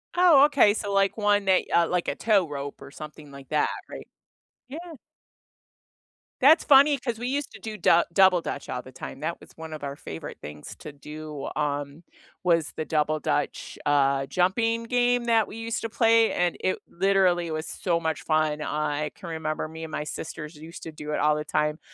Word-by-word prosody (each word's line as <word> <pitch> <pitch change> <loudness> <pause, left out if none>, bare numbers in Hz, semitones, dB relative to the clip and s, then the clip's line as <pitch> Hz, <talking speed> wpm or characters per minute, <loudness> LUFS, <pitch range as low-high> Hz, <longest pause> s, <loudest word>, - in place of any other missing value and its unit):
Oh, 345 -6 +7
okay, 275 -8 +4
so, 205 -1 -4
like, 195 +1 +2
one 205 -1 +2
that 190 -1 +4
uh, 170 -1 +4
like, 180 -1 -1
a - - -1
tow 205 -6 +2
rope 140 -1 -6
or 140 0 -11
something 150 -1 -10
like 140 -2 -12
that, 150 -1 +2 0.2
right? - - -9 0.6
Yeah. 285 +5 -7 1.6
That's 305 +5 +7
funny 280 0 +6
'cause 240 -2 -3
we 240 +2 -4
used 285 +2 -2
to - - -11
do 220 -1 -6
Dou 170 -4 +4
Double 190 -2 +5
Dutch 145 - -6
all 125 - -3
the 130 - -12
time. 130 +2 -9
That 165 +2 -3
was - - -15
one 160 -1 -8
of 155 - -8
our 140 0 -4
favorite 80 - -8
things 75 0 -9
to 150 - -9
do, 150 +1 -8
um, 145 +1 -3 0.4
was 165 -4 +2
the 155 - -2
Double 155 0 0
Dutch, - - -2
uh, 140 -1 +2
jumping 225 - +1
game 245 +1 +1
that 225 -2 +3
we 215 - -9
used 225 0 -3
to 225 - -3
play, 225 0 +4
and 175 -1 0
it 185 - 0
literally 185 -2 +2
was 155 0 -4
so 170 -2 -1
much 160 -2 -2
fun; 155 -1 0
I 150 0 -2
can 175 - -9
remember 155 -1 -3
me 160 +1 -9
and 160 - -7
my 150 - -3
sisters 150 +1 -7
used 160 +3 -11
to 160 - -7
do 150 -1 -7
it - - -1
all 150 0 +3
the 150 - -3
time. 150 +1 0
165 Hz, 200 wpm, -26 LUFS, 150-215 Hz, 1.6 s, Oh